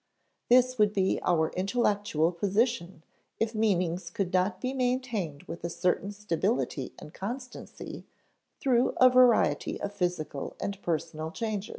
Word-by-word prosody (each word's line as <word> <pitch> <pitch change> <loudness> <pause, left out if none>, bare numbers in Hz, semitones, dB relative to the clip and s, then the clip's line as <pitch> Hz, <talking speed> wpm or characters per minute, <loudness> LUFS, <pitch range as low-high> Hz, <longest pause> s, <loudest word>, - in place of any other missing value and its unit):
This 255 0 +4
would 210 -1 +4
be 190 -2 +1
our 160 -2 +2
intellectual 200 -5 +1
position 195 - 0 0.4
if 225 0 0
meanings 185 -5 0
could 180 +1 -3
not 185 +1 +1
be 255 +1 -2
maintained 245 - -1
with 170 - -8
a 170 - -2
certain 180 +3 0
stability 200 - -1
and 150 - -11
constancy 250 +6 -7 0.5
through 250 -3 +2
a 255 0 +7
variety 250 -2 +4
of 205 - -4
physical 175 -7 -3
and 200 0 -4
personal 160 -1 -2
changes. 215 +2 -3
200 Hz, 130 wpm, -29 LUFS, 175-235 Hz, 0.5 s, a